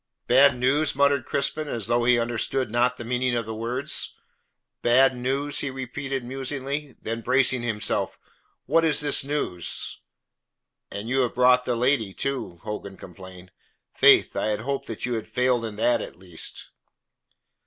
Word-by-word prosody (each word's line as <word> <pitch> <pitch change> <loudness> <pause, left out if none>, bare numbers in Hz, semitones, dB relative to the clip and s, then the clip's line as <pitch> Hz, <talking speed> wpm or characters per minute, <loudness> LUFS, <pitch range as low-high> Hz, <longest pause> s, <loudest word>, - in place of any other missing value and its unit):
"Bad 135 +1 +5
news?" 135 +5 +1
muttered 140 -2 +2
Crispin, 150 +2 -1
as 115 -7 -2
though 120 +2 +1
he 125 0 +5
understood 120 +1 -1
not 125 +2 +1
the 120 - -7
meaning 125 +1 0
of 115 -1 -2
the 110 - -5
words. 125 +7 -1 0.7
"Bad 130 +2 +4
news?" 135 +4 -1
he 140 - -1
repeated 135 0 -5
musingly. 135 +2 -4
Then 115 +1 -4
bracing 130 +1 +2
himself, 115 -3 -2 0.5
"What 165 +5 +3
is 160 -2 +4
this 145 -2 +3
news?" 135 - -2 0.9
"And 100 +2 -6
you 130 +3 0
have 125 -3 0
brought 125 0 +4
the 125 - 0
lady 115 -4 +1
too!" 135 -10 -3
Hogan 105 -2 -6
complained. 90 0 -12 0.4
"Faith, - - +5
I - - -1
had 105 0 -1
hoped 140 +3 -3
that 115 - -5
you 125 - -2
had 110 -2 -4
failed 125 -1 +1
in 110 -2 -6
that 120 +2 +2
at - - -8
least." 90 -3 -4
125 Hz, 160 wpm, -25 LUFS, 115-135 Hz, 0.9 s, Bad